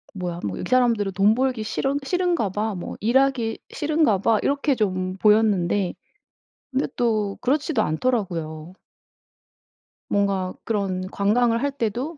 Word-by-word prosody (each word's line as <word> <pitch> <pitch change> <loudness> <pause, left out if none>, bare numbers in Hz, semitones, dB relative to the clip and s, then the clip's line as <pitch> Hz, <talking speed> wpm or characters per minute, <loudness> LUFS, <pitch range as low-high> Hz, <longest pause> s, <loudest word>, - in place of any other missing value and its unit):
'뭐야 175 -2 -4
뭐 100 - -3
이 - - -5
사람들은 235 -6 +2
돈 200 +3 +4
벌기 255 -3 0
싫은 270 +6 -1
싫은가 350 - 0
봐. 210 +2 -2
뭐 175 - -6
일하기 240 0 +1
싫은가 300 -9 +2
봐.' 220 +2 +2
이렇게 285 0 +1
좀 185 -4 -1
보였는데 205 -3 +3 0.8
근데 270 +1 0
또 215 -4 0
그렇지도 290 +4 +1
않더라고요. 165 -5 -2 1.4
뭔가 195 -2 0
그런 195 -4 -1
관광을 230 +4 +2
할 285 - +1
때도 265 +5 -3
220 Hz, 270 characters per minute, -23 LUFS, 195-260 Hz, 1.4 s, 돈